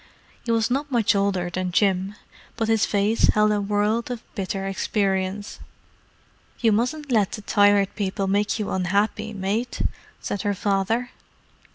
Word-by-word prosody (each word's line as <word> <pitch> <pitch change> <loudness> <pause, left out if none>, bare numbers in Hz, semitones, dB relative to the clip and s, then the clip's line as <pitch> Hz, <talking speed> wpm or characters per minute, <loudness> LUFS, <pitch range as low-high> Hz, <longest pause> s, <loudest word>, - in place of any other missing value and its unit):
He 235 - 0
was 225 +1 +1
not 285 +3 -1
much 230 -4 +3
older 195 -3 0
than 185 0 -2
Jim, 195 +1 +1 0.4
but 225 -1 -1
his 225 -1 +3
face 205 +2 +2
held 210 0 +4
a 205 -1 +1
world 210 +3 0
of 245 -2 -5
bitter 195 -1 -3
experience. 195 +1 -1 1.0
"You 230 -2 +3
mustn't 265 +7 -1
let 210 -5 +2
the 210 - -6
Tired 205 -1 +3
People 195 0 -2
make 205 +3 +1
you 210 -2 -3
unhappy, 205 +4 0
mate," 210 +4 -2 0.4
said 200 - -3
her 205 -1 -1
father. 205 +5 0
205 Hz, 150 wpm, -24 LUFS, 195-225 Hz, 1.0 s, held